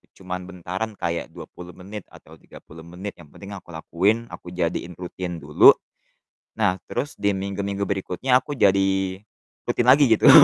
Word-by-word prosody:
cuman 90 -1 -6
bentaran 95 +4 -5
kayak 85 -1 -2
20 90 0 -10
menit 100 +2 -9
atau - - -16
30 80 +1 -14
menit, 95 +4 -6
yang 80 - -13
penting 100 +6 -12
aku 95 -3 -9
lakuin, 105 +8 0
aku - - -10
jadiin 85 0 -2
rutin 90 -1 -6
dulu. - - +7 0.8
Nah 100 -4 +1
terus 145 - -4
di 100 0 +1
minggu-minggu 100 +1 -3
berikutnya 100 +6 +1
aku 145 +3 -4
jadi 95 -4 +2 0.5
rutin 120 - 0
lagi 140 +2 +7
gitu. - - +6
95 Hz, 150 wpm, -23 LUFS, 90-105 Hz, 0.8 s, dulu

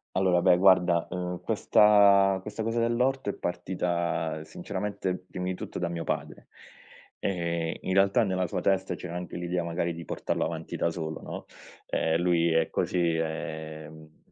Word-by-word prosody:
Allora 90 -2 +3
beh 90 - +6
guarda, 90 -2 +4
uhm, 90 0 -4
questa 100 -2 +5
questa 105 +1 -5
cosa 115 +1 -1
dell'orto 120 0 +1
è - - -11
partita 85 -3 -2
sinceramente 95 +2 -4
primi 90 0 -5
tutto - - -6
da 85 - -1
mio 85 -1 -4
padre. - - -4 0.7
Ehm, 85 -3 -2
in 95 - -2
realtà 100 +4 +4
nella 95 -3 0
sua 90 +1 -3
testa 95 -1 +1
c'era 85 0 -7
anche 90 0 -5
l'idea, 90 0 -2
magari, 85 0 -1
di 85 0 -8
portarlo - - -2
avanti - - -5
da 85 - 0
solo, 80 -2 -5
no, - - -7 0.4
ehm, 80 +1 +1
lui 85 -1 +3
è 80 0 +2
così, 85 -2 0
ehm 80 -1 -6
90 Hz, 155 wpm, -28 LUFS, 85-95 Hz, 0.7 s, beh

